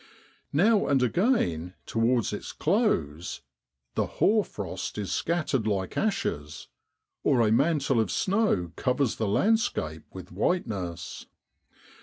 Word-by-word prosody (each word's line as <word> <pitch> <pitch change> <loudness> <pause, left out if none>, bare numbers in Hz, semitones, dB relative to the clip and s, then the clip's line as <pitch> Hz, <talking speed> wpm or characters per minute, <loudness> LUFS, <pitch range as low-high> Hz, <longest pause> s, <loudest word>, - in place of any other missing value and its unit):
Now 205 +8 +3
and 135 -2 +3
again 115 - +1
towards 115 -1 +1
its 105 - -6
close 90 - 0 0.3
' 65 -1 -56
the - - 0
hoar 215 0 +4
frost 95 - -6
is 105 -2 -3
scattered 145 -9 0
like 95 -3 -1
ashes,' 85 - -2 0.5
or 130 -4 +3
a - - +2
mantle 140 0 +2
of 110 -4 +1
snow 185 - +1
covers 130 -1 0
the 110 - -1
landscape 100 - +1
with 95 -1 -10
whiteness. 90 - -2
115 Hz, 120 wpm, -27 LUFS, -, 0.5 s, hoar